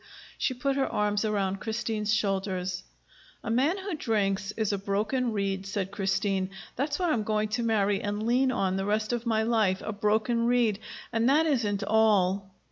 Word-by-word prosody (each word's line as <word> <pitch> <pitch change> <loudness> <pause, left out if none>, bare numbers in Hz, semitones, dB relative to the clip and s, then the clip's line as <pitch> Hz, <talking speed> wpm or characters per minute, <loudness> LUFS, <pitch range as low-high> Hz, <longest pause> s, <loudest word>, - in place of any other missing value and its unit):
She 260 - 0
put 275 +2 -1
her 270 - +2
arms 210 0 0
around 195 -2 0
Christine's 220 -2 -2
shoulders. 190 -3 -1 0.6
"A - - -3
man 275 +10 +2
who 390 -1 -4
drinks 205 -8 0
is 215 -2 0
a 200 - -1
broken 215 +6 0
reed," 195 -2 -2
said 195 -1 -3
Christine. 195 -1 0 0.3
"That's 285 +3 -1
what 355 -3 +1
I'm 235 - +1
going 215 0 0
to 235 - -1
marry 205 -3 +1
and 205 +1 -2
lean 255 +3 +3
on 190 -6 0
the 195 - -1
rest 215 +3 0
of 240 0 -3
my 220 -1 +2
life 220 -5 +1
a 215 - -3
broken 220 +3 +1
reed. 235 -4 +2 0.3
And 230 +2 +2
that 305 +4 +4
isn't 220 -9 0
all!" 200 -3 +2
215 Hz, 180 wpm, -28 LUFS, 195-235 Hz, 0.6 s, that